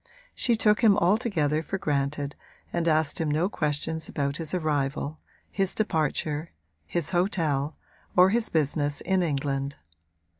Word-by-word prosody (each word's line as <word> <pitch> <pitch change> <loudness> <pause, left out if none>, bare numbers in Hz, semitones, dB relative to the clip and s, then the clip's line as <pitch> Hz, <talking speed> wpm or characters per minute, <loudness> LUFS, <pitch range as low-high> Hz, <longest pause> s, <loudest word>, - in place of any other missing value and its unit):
She 240 - +2
took 215 0 +3
him 210 -3 +6
altogether 175 - +2
for 180 +5 -3
granted 145 -2 -1 0.4
and 170 -1 0
asked 155 -1 +2
him 160 - 0
no 155 +5 +2
questions 160 -2 -2
about 140 0 -1
his 160 -2 -2
arrival, 150 -3 -1 0.3
his 195 -2 -1
departure, 155 -5 0 0.4
his 170 - -2
hotel 160 -6 0 0.4
or 185 +1 +7
his 230 +1 +1
business 145 -2 0
in 190 0 +1
England. 140 -3 -1
155 Hz, 135 wpm, -27 LUFS, 145-185 Hz, 0.4 s, or